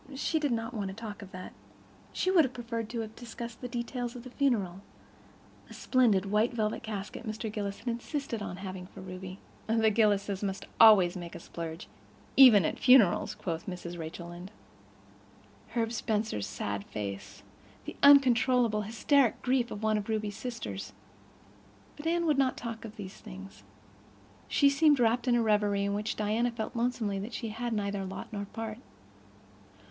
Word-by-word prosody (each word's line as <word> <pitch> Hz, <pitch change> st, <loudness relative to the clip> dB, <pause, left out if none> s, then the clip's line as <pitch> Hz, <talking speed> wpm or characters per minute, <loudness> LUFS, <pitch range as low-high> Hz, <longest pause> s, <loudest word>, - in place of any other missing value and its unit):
She 315 Hz, +4 st, 0 dB
did 290 Hz, -3 st, 0 dB
not 230 Hz, +1 st, -2 dB
want 205 Hz, -4 st, -3 dB
to 190 Hz, -, -6 dB
talk 220 Hz, -1 st, -7 dB
of 200 Hz, -, -10 dB
that. 185 Hz, 0 st, -8 dB, 0.6 s
She 370 Hz, -, 0 dB
would 350 Hz, -4 st, +6 dB
have 260 Hz, -2 st, -3 dB
preferred 230 Hz, -2 st, -4 dB
to 235 Hz, -1 st, -3 dB
have 220 Hz, 0 st, -7 dB
discussed 235 Hz, -1 st, -8 dB
the 250 Hz, -, -4 dB
details 240 Hz, 0 st, -4 dB
of 245 Hz, -, -8 dB
the 255 Hz, -, -10 dB
funeral—the 205 Hz, -10 st, -4 dB
splendid 225 Hz, -7 st, +3 dB
white 215 Hz, +3 st, +3 dB
velvet 215 Hz, -2 st, -1 dB
casket 210 Hz, 0 st, -6 dB
Mr. 220 Hz, -1 st, -4 dB
Gillis 200 Hz, -2 st, -3 dB
had -, -, -14 dB
insisted 240 Hz, 0 st, -3 dB
on 180 Hz, -3 st, -5 dB
having 185 Hz, -1 st, -7 dB
for 195 Hz, -, -13 dB
Ruby—"the 190 Hz, +4 st, -2 dB
Gillises 205 Hz, -2 st, +2 dB
must 195 Hz, -2 st, -3 dB
always 200 Hz, -6 st, +8 dB
make 175 Hz, -2 st, -7 dB
a -, -, -6 dB
splurge, 165 Hz, 0 st, -7 dB, 0.5 s
even 235 Hz, -9 st, +8 dB
at -, -, -2 dB
funerals," 250 Hz, -8 st, +5 dB
quoth 165 Hz, -2 st, -4 dB
Mrs. 175 Hz, -2 st, -6 dB
Rachel 165 Hz, +2 st, -7 dB
Lynde—Herb 100 Hz, -, -9 dB
Spencer's 215 Hz, -, -1 dB
sad 100 Hz, 0 st, -4 dB
face, 100 Hz, -2 st, -6 dB, 0.4 s
the -, -, -7 dB
uncontrolled, 255 Hz, -4 st, +6 dB
hysteric 235 Hz, +3 st, +2 dB
grief 250 Hz, -2 st, +1 dB
of 210 Hz, -, -7 dB
one 215 Hz, -1 st, +2 dB
of 205 Hz, -, -7 dB
Ruby's 215 Hz, -2 st, -2 dB
sisters—but 100 Hz, -, -10 dB
Anne 340 Hz, +1 st, +1 dB
would 300 Hz, -4 st, +2 dB
not 260 Hz, -2 st, +2 dB
talk 230 Hz, -2 st, -6 dB
of 220 Hz, 0 st, -9 dB
these 195 Hz, -2 st, -8 dB
things. 195 Hz, -2 st, -11 dB, 0.9 s
She 285 Hz, -, +4 dB
seemed 290 Hz, 0 st, +4 dB
wrapped 240 Hz, +1 st, +2 dB
in 245 Hz, -, +4 dB
a 235 Hz, -, +3 dB
reverie 205 Hz, -2 st, +2 dB
in 200 Hz, -, -1 dB
which 210 Hz, +2 st, -2 dB
Diana 215 Hz, +3 st, +1 dB
felt 230 Hz, 0 st, -5 dB
lonesomely 230 Hz, -4 st, -1 dB
that 215 Hz, +5 st, -6 dB
she 230 Hz, -, -4 dB
had 235 Hz, +2 st, -4 dB
neither 200 Hz, -2 st, -2 dB
lot 190 Hz, +3 st, -7 dB
nor 200 Hz, -1 st, -3 dB
part. 220 Hz, +2 st, -6 dB
215 Hz, 165 wpm, -30 LUFS, 185-240 Hz, 0.9 s, always